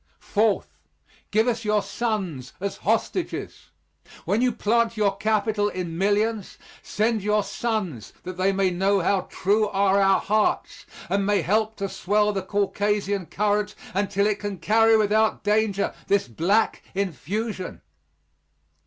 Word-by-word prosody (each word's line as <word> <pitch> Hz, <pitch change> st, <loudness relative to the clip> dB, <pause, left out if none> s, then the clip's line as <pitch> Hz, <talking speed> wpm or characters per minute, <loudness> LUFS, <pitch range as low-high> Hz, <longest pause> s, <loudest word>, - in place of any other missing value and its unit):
Fourth, 215 Hz, -1 st, 0 dB, 0.5 s
give 220 Hz, +3 st, +2 dB
us 235 Hz, -1 st, 0 dB
your 210 Hz, -1 st, +1 dB
sons 190 Hz, -, -3 dB
as 200 Hz, +1 st, -3 dB
hostages. 230 Hz, -, -2 dB, 0.6 s
When 215 Hz, +4 st, +1 dB
you 250 Hz, 0 st, +3 dB
plant 230 Hz, +1 st, +1 dB
your 200 Hz, -2 st, +2 dB
capital 210 Hz, 0 st, +1 dB
in 180 Hz, -4 st, -5 dB
millions, 205 Hz, +3 st, 0 dB, 0.2 s
send 220 Hz, +1 st, 0 dB
your 210 Hz, +1 st, +1 dB
sons 200 Hz, -, -3 dB
that 185 Hz, 0 st, -6 dB
they 185 Hz, +2 st, +2 dB
may 195 Hz, -1 st, +1 dB
know 195 Hz, +2 st, +2 dB
how 190 Hz, +2 st, 0 dB
true 210 Hz, +3 st, +1 dB
are 200 Hz, 0 st, +2 dB
our 195 Hz, 0 st, +4 dB
hearts 215 Hz, +1 st, 0 dB, 0.2 s
and 200 Hz, 0 st, 0 dB
may 200 Hz, -3 st, +1 dB
help 215 Hz, +6 st, +1 dB
to 200 Hz, -, -3 dB
swell 210 Hz, +2 st, +1 dB
the 195 Hz, -, -1 dB
Caucasian 200 Hz, -1 st, -1 dB
current 210 Hz, 0 st, 0 dB, 0.2 s
until 200 Hz, +1 st, +1 dB
it 210 Hz, -1 st, 0 dB
can 205 Hz, -2 st, -4 dB
carry 225 Hz, +3 st, +4 dB
without 215 Hz, +1 st, +2 dB
danger 210 Hz, -1 st, +1 dB
this 200 Hz, -6 st, +2 dB
black 190 Hz, -, +1 dB
infusion. 200 Hz, +2 st, -3 dB
205 Hz, 135 wpm, -24 LUFS, 195-215 Hz, 0.6 s, our